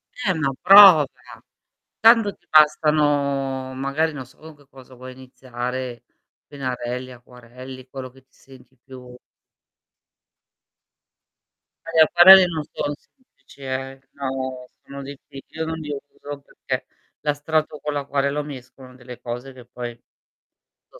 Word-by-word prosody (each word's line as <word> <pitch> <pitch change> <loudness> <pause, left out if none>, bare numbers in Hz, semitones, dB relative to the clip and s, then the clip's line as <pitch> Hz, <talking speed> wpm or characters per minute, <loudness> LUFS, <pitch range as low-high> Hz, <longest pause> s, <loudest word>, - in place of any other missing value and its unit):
Eh, 205 -7 -1
ma 155 -5 -1
prova. 190 -5 +9 0.9
Tanto 225 -2 +5
ti - - -38
bastano 145 -3 +2
magari, 140 +4 -2
non 135 -3 -8
so 130 - -23
con 160 0 -14
che 145 -2 -24
cosa 130 -1 -16
vuoi 130 +1 -11
iniziare, 125 -1 -7 0.4
pennarelli, 130 -2 -5
acquarelli, 125 +1 -13
quello 130 -1 -8
che 135 +1 -20
ti - - -48
senti 130 -1 -19
più 125 -2 -13 2.7
Eh, - - -9
gli 160 - +7
acquarelli 180 +4 +8
non 160 -3 -4
sono 145 - -3
semplici, 155 - -24
eh, 135 0 -5
no 130 -2 -5 0.2
sono 140 0 -9
diffi 135 0 -11
io 160 +1 -5
non 160 0 -5
li 150 - -8 0.2
uso 145 0 -9
perché - - -6 0.3
l'astratto 150 +1 -2
con 150 - -3
l'acquarello 140 0 -2
mescolano 130 -2 -12
delle 125 -1 -12
cose 125 +2 -7
che 125 -2 -15
poi 120 -1 -8 0.9
so' - - -18
135 Hz, 130 wpm, -22 LUFS, 130-150 Hz, 2.7 s, prova